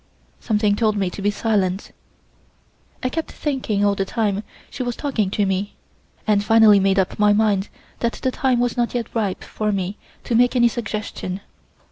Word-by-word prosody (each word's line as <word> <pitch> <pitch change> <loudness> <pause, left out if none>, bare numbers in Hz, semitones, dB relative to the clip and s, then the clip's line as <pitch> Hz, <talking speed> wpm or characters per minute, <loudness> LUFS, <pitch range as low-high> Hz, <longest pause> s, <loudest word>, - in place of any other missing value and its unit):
Something 210 -2 +1
told 215 -1 +1
me 190 -3 0
to 200 - -7
be 205 - +2
silent. 200 -3 -1 1.1
I 255 - +1
kept 320 +5 -4
thinking 245 -8 -1
all 205 - +3
the 195 - -1
time 205 -1 -1 0.3
she - - -6
was 245 -2 -2
talking 235 -9 -1
to 205 +1 0
me, 195 +1 -2 0.5
and 205 -1 +2
finally 220 -1 +6
made 195 0 +2
up 190 +1 0
my 210 0 +5
mind 205 -2 +2 0.3
that 235 0 0
the 260 - -2
time 255 -2 +1
was 245 -1 0
not 240 -1 -1
yet 235 -2 -3
ripe 205 -5 -1
for 215 -1 -2
me 195 0 -2 0.3
to - - -3
make 245 +2 +4
any 240 -1 +5
suggestion. 210 -4 -4
210 Hz, 180 wpm, -21 LUFS, 200-235 Hz, 1.1 s, finally